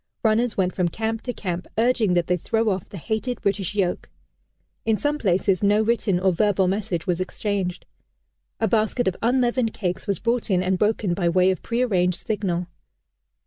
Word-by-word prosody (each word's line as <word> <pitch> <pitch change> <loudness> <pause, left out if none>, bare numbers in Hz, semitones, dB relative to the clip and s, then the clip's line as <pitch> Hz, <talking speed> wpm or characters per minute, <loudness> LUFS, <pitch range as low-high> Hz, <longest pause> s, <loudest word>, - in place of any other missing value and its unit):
Runners 225 +1 +2
went 185 -1 +1
from 180 -2 +1
camp 220 +5 -2
to 250 - -3
camp, 180 -6 -4
urging 225 -5 +2
that 175 -1 +2
they 180 - +1
throw 225 +5 0
off 190 -2 -2
the 200 - -8
hated 220 - -3
British 200 0 -1
yoke. 185 -3 -1 0.7
In 220 -1 +2
some 295 +4 -1
places 190 - +1
no 205 +1 +3
written 220 -5 +1
or 185 0 +2
verbal 195 0 +2
message 185 -3 -2
was 180 0 0
exchanged. 185 -1 -3 0.7
A 225 - +2
basket 220 +2 +1
of 185 - +1
unleavened 245 -1 +1
cakes 180 -2 -3
was 200 - 0
brought 235 0 -1
in 185 -2 +2
and 185 0 0
broken, 210 -3 +1
by 175 -1 +1
way 185 +2 +4
of 185 - -4
prearranged 195 -7 0
signal. 185 -5 -1
200 Hz, 180 wpm, -23 LUFS, 180-225 Hz, 0.7 s, way